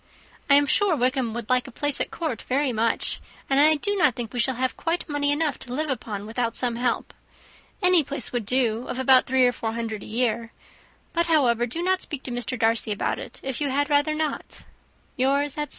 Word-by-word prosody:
I 280 - +7
am 285 0 +5
sure 375 +5 +2
Wickham 255 -2 0
would 235 -2 -5
like 255 0 +1
a - - -10
place 290 +3 -1
at - - 0
court 310 -10 -4
very 265 0 0
much; 225 +1 0 0.3
and 270 0 +2
I 310 +2 +6
do 405 +8 -1
not 355 - +3
think 235 -4 -6
we 245 - -3
shall 255 +3 +2
have 255 +1 -1
quite 335 +1 -2
money 290 -1 0
enough 295 -2 0
to 245 - -4
live 305 0 -1
upon 210 -5 -5
without 230 +1 -2
some 240 -2 +2
help. 245 +1 -1 0.7
Any 360 -3 +6
place 280 -1 -4
would 240 -5 -3
do 245 -2 +1
of - - -4
about 260 0 +4
three 260 0 +4
or 245 - +4
four 225 -2 -4
hundred 225 -3 -4
a - - -9
year; 230 0 -1 0.6
but, 340 0 +1
however, 245 -7 +2
do 330 +9 -4
not 375 +1 +1
speak 285 -3 -4
to 255 - -6
Mr. 245 0 -1
Darcy 225 -1 +1
about 205 - -1
it, - - -9
if 265 0 -3
you 285 - 0
had 285 +2 0
rather 290 +1 +2
not. 310 -1 -4 0.5
"Yours," 280 +3 +1
etc. 295 0 -4
260 Hz, 220 wpm, -24 LUFS, 235-290 Hz, 0.7 s, I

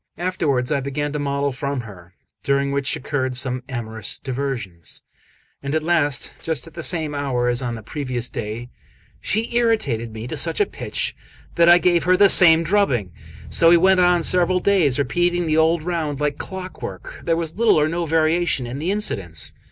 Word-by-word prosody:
Afterwards 150 -8 -1
I 145 - +1
began 140 +2 -3
to 150 - -2
model 140 0 -1
from 140 0 -3
her, 95 -5 -13 0.3
during 140 0 0
which 140 -1 -1
occurred 130 -2 -2
some 130 -1 -1
amorous 110 -4 -3
diversions; 125 - -5 0.6
and 140 +2 -3
at 155 - 0
last, 155 -5 0
just 160 -6 -3
at 165 - -14
the 170 - -6
same 160 -3 -2
hour 130 -4 -1
as 120 +1 +1
on 120 -2 -3
the 110 - -9
previous 125 -2 -3
day, 115 +2 -6 0.5
she 225 +3 -2
irritated 180 - +1
me 110 +1 -7
to 125 - -5
such - - 0
a 415 - +4
pitch - - -4 0.4
that 170 0 +4
I 175 - +8
gave 175 -1 +2
her 185 0 +4
the 200 +1 +6
same 165 -3 +7
drubbing. 155 - +1 0.4
So 165 - +5
we 170 - +7
went 190 +2 +4
on 175 -1 +3
several 180 +2 +2
days, 180 -8 +2
repeating 175 +4 0
the 155 -1 +1
old 160 0 +2
round 160 -5 -2
like 150 -1 -1
clockwork. 190 - -7
There 165 -1 0
was 165 0 -4
little 230 -7 +4
or 150 - +2
no 170 +2 -2
variation 160 -3 +1
in 125 +3 -6
the 165 +4 -2
incidents. 100 - -2
150 Hz, 185 wpm, -21 LUFS, 125-175 Hz, 0.6 s, I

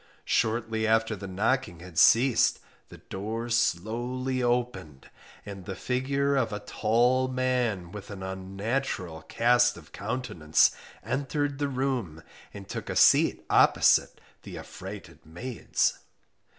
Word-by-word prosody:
Shortly 110 0 0
after 110 0 +2
the 100 0 -8
knocking 105 0 -1
had 85 -3 -4
ceased, 125 +1 +5 0.3
the - - -12
door 110 +5 -5
slowly 120 +4 -1
opened, 120 - -2 0.3
and 100 -3 -8
the 95 - -5
figure 140 +4 0
of 120 -5 +1
a 105 - -3
tall 120 +5 +1
man 125 -8 -1
with 105 0 -9
an 100 -2 -7
unnatural 95 -1 -3
cast 120 +7 +2
of 80 -3 -15
countenance 100 -9 +1 0.3
entered 140 +1 -2
the 145 -1 0
room 125 - -2 0.3
and 100 -1 -10
took - - -6
a - - -3
seat - - +4
opposite - - +4 0.2
the - - -9
affrighted - - -10
maids. 110 +10 -2
115 Hz, 125 wpm, -27 LUFS, 95-130 Hz, 0.3 s, ceased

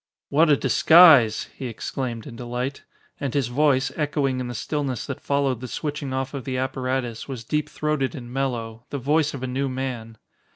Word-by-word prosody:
"What 155 +3 +4
a 145 - +5
disguise!" 140 -3 +6
he 130 - -5
exclaimed 120 0 -4
in 115 - -9
delight. 125 +3 -4 0.4
And 140 -2 -3
his 135 -4 +1
voice, 135 0 +2
echoing 145 -4 0
in 125 - -3
the 120 - -6
stillness 140 0 -2
that 140 - -6
followed 140 -4 0
the 130 - -5
switching 145 +1 -4
off 130 +1 -2
of 140 -2 -5
the 130 0 -3
apparatus, 130 -2 -2
was 130 -5 -6
deep 150 +5 -1
throated 150 -1 -1
and 120 -3 -8
mellow 120 -4 -3
the 140 - -3
voice 150 +3 +1
of 130 - -7
a - - 0
new 135 +2 -1
man. 125 -4 -5
130 Hz, 190 wpm, -24 LUFS, 125-145 Hz, 0.4 s, disguise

